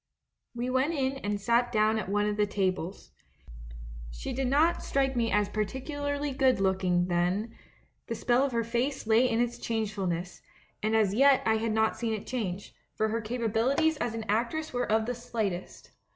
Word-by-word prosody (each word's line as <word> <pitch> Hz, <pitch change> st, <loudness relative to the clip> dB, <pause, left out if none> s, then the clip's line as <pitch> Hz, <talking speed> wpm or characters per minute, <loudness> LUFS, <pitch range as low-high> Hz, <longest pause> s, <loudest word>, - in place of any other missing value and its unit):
"We 240 Hz, +1 st, -2 dB
went 265 Hz, +6 st, +1 dB
in 270 Hz, -1 st, 0 dB
and 205 Hz, -5 st, -2 dB
sat 235 Hz, +3 st, +2 dB
down 215 Hz, 0 st, +2 dB
at 200 Hz, -, -5 dB
one 205 Hz, +1 st, +1 dB
of 210 Hz, 0 st, 0 dB
the 210 Hz, 0 st, +1 dB
tables. 190 Hz, -2 st, -2 dB, 1.0 s
She -, -, -6 dB
did 265 Hz, +1 st, -1 dB
not 305 Hz, +6 st, +3 dB
strike 270 Hz, -1 st, 0 dB
me 230 Hz, -1 st, +1 dB
as 205 Hz, 0 st, +2 dB
particularly 285 Hz, +7 st, -3 dB
good 260 Hz, -3 st, +2 dB
look 190 Hz, -1 st, +1 dB
ing 175 Hz, -1 st, +2 dB
then; 180 Hz, +6 st, 0 dB, 0.5 s
the 230 Hz, -, -3 dB
spell 245 Hz, +3 st, +2 dB
of 280 Hz, -, 0 dB
her 230 Hz, -1 st, 0 dB
face 240 Hz, +4 st, -2 dB
lay 225 Hz, +3 st, +4 dB
in 230 Hz, -1 st, 0 dB
its 240 Hz, 0 st, -1 dB
change 220 Hz, -2 st, -2 dB
fulness, 180 Hz, -3 st, -3 dB, 0.4 s
and 215 Hz, +1 st, +1 dB
as 210 Hz, -3 st, +3 dB
yet 275 Hz, +3 st, +5 dB
I 220 Hz, 0 st, +3 dB
had 225 Hz, 0 st, -1 dB
not 220 Hz, 0 st, +1 dB
seen 225 Hz, -2 st, -1 dB
it 210 Hz, -, -7 dB
change, 200 Hz, -6 st, -4 dB, 0.2 s
for 220 Hz, 0 st, +1 dB
her 230 Hz, +1 st, -1 dB
capabilities 245 Hz, +7 st, +1 dB
as 235 Hz, -5 st, -2 dB
an 225 Hz, -1 st, -4 dB
actress 245 Hz, +9 st, -1 dB
were 245 Hz, -3 st, -1 dB
of 220 Hz, 0 st, +3 dB
the 245 Hz, -, -2 dB
slight 230 Hz, -5 st, -2 dB
est. 175 Hz, -, -10 dB
225 Hz, 195 wpm, -29 LUFS, 205-255 Hz, 1.0 s, yet